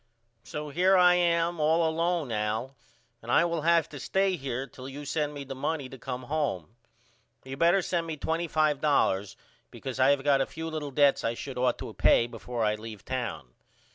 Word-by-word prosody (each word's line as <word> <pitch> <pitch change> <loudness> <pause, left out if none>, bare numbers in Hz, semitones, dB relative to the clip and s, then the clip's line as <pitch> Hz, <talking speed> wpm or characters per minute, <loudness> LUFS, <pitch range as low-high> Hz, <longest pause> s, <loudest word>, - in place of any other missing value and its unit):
So 150 0 -6
here 185 +6 +3
I 180 -1 +6
am 170 -1 +1
all 160 +2 +3
alone 165 -3 0
Al 110 +4 -2 0.5
and 115 - -6
I 165 - +5
will 170 -2 -1
have 165 0 +3
to 145 - -9
stay 190 +5 +1
here 135 -4 -4
till 130 -1 -10
you 145 +2 -8
send 150 +1 -1
me 140 - -5
the 135 0 -7
money 135 +1 -3
to 135 - -10
come 125 0 -5
home. 125 - -3 0.7
You 130 0 -7
better 170 +5 +3
send 170 -2 -1
me 160 -1 -4
$25 150 - +1 0.3
because - - -7
I - - +5
have 140 -1 +2
got 140 -1 +3
a - - 0
few 160 0 -6
little 155 -2 -4
debts 140 0 +3
I 115 +1 -1
should 130 0 -6
ought 125 -1 +2
to - - -7
pay 115 - +4
before 120 0 -5
I 105 - +2
leave 110 -1 -9
town. 115 - -4
145 Hz, 195 wpm, -28 LUFS, 125-165 Hz, 0.7 s, I